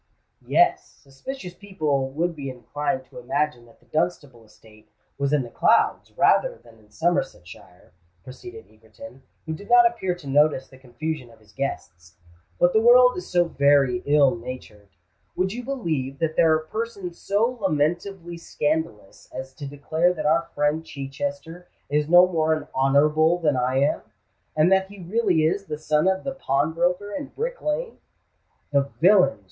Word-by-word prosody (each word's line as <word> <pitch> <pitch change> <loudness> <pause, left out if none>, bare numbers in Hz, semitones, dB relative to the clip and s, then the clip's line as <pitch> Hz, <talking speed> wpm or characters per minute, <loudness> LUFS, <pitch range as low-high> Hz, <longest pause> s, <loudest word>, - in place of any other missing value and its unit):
"Yes—suspicious 180 - -1
people 155 -9 -2
would 165 +5 -2
be 140 -2 -6
inclined 145 +6 -4
to - - -12
imagine 150 - -2
that 115 - -22
the - - -28
Dunstable 135 -3 -3
estate 110 0 -21 0.3
was 140 0 0
in 150 -3 +2
the 120 - -10
clouds - - +2
rather - - +3
than 115 -1 -20
in 105 -1 -24
Somersetshire," 110 - -4 0.3
proceeded 365 - -11
Egerton, 280 - -15 0.2
who 160 - -4
did 200 +6 -10
not 240 0 +7
appear 190 -6 0
to 175 -4 -15
notice 145 -1 +2
the 130 - -17
confusion 130 +1 -5
of 115 - -18
his 110 -1 -23
guests. 90 -9 -6 0.4
"But - - +3
the 440 - +4
world - - +6
is 365 - -7
so 175 -1 +3
very 140 -5 +2
ill 145 -3 +4
natured! 115 -4 -10 0.5
Would 190 +2 -1
you 245 +2 -6
believe 160 - -3
that 160 0 -2
there 165 -1 +4
are 155 0 +1
persons 215 -6 -5
so 230 +5 0
lamentably 175 +1 -1
scandalous 150 -11 -3
as 130 +1 -8
to 140 +1 -8
declare 155 +5 0
that 155 -2 -5
our 165 +2 +2
friend 150 +2 0
Chichester 165 +5 -6 0.2
is 150 +1 +1
no 175 +1 +8
more 160 -3 +1
an 155 - -7
Honourable 150 +5 +3
than 155 -5 +1
I 125 +1 0
am, 140 +2 +1 0.5
and 155 +4 +3
that 190 0 +3
he 200 -2 -11
really 185 -4 +1
is 195 +5 0
the 150 -4 -5
son 155 +2 +1
of 190 0 +1
the 275 - -3
pawnbroker 175 - -1
in 285 -1 -5
Brick - - -5
Lane?" 460 +11 -3 0.7
"The 140 -1 +1
villains!" 185 - +5
155 Hz, 165 wpm, -24 LUFS, 135-190 Hz, 0.7 s, no